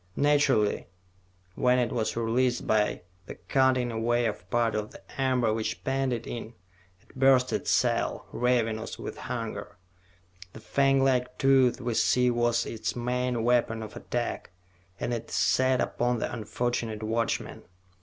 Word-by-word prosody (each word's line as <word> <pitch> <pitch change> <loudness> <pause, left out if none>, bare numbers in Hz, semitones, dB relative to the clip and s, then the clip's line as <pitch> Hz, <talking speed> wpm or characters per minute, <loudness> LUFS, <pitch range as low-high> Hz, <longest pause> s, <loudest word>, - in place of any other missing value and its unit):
Naturally, 140 -7 +2 0.7
when 125 +3 +2
it 120 -3 +1
was 115 -1 -2
released 120 +2 +1
by 105 -4 +1 0.2
the - - -7
cutting 130 -2 +1
away 120 +1 +1
of 100 -5 -4
part 115 -1 +1
of 105 0 -2
the 100 +7 -10
amber 125 -4 +2
which 110 0 -3
penned 135 0 0
it 120 -1 -3
in, 115 -1 -7 0.4
it - - -24
burst 130 -1 +4
its - - -2
cell, - - +1
ravenous 115 -3 0
with - - -6
hunger. - - -5 0.8
The - - -10
fanglike 135 0 +2
tooth 135 -2 +4
we 120 -2 -2
see 125 +2 +3
was 120 0 +1
its 110 - -4
main 125 -1 -1
weapon 115 -2 +1
of 110 - -9
attack, 120 -1 -4 0.5
and 120 - -2
it 115 - -5
set 130 +4 +2
upon 120 0 0
the - - -3
unfortunate 110 -1 -3
watchman. 115 0 -2
120 Hz, 145 wpm, -28 LUFS, 115-125 Hz, 0.8 s, burst